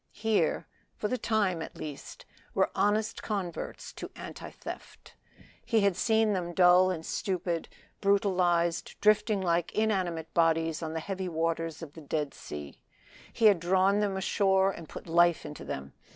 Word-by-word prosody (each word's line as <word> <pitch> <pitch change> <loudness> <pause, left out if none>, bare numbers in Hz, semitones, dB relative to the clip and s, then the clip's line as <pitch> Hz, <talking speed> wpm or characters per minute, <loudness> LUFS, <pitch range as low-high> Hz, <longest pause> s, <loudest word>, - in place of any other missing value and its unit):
Here 220 -1 +1 0.3
for 210 - -2
the 255 - -1
time 200 -7 +1
at - - -7
least 150 -3 -8 0.3
were - - +2
honest 210 +2 +1
converts 195 -5 -4
to - - -7
anti - - -8
theft. - - -10 0.5
He 225 -2 +2
had 200 -2 +3
seen 220 +2 +2
them 175 -2 -3
dull 180 0 +6
and 165 -3 -3
stupid, 175 -3 -2 0.3
brutalized, 180 -4 +1
drifting 210 -1 +3
like 170 -2 +1
inanimate 185 -7 -1
bodies 165 -1 +2
on 160 -1 -4
the 160 - -2
heavy 190 0 -4
waters 165 0 -2
of 145 -3 -9
the 160 - -11
Dead 150 -1 -2
Sea. 75 -1 -9 0.5
He 230 - 0
had 205 -5 +7
drawn 190 +3 +3
them 200 -2 0
ashore 190 0 +2
and 165 -4 -10
put - - -9
life 170 0 +3
into 150 0 -8
them. 70 0 -6
180 Hz, 155 wpm, -29 LUFS, 165-200 Hz, 0.5 s, had